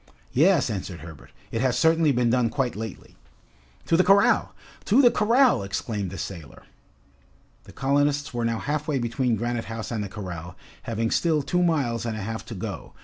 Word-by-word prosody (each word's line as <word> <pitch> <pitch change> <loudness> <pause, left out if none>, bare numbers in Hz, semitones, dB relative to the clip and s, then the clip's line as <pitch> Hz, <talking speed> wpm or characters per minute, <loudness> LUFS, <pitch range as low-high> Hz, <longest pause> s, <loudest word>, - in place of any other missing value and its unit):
"Yes," 155 -2 +4
answered 95 -4 -5
Herbert, 80 -4 -12 0.2
"it 115 - -1
has 130 -2 +1
certainly 160 -2 +4
been 120 -2 +2
done 120 -1 +2
quite 125 -1 -1
lately." 110 -2 -8 0.7
"To - - +2
the 185 - +5
corral! 195 +1 +4 0.3
to 225 +7 +4
the 245 -4 +7
corral!" 240 - +3
exclaimed 100 0 -3
the 95 - -8
sailor. 85 -6 -8 1.0
The - - -13
colonists 145 +1 0
were 120 -1 -2
now 115 0 0
half 150 +4 -3
way 150 -3 0
between 120 0 0
Granite 120 +1 -2
House 115 0 -6
and 110 -3 -2
the 100 - -6
corral, 90 -4 -7 0.3
having 115 0 -1
still 160 -4 +1
two 180 +6 0
miles 140 -10 +1
and 110 -1 -3
a - - -5
half 110 +3 -4
to 115 - -7
go. 95 -2 -6
120 Hz, 185 wpm, -25 LUFS, 110-150 Hz, 1.0 s, the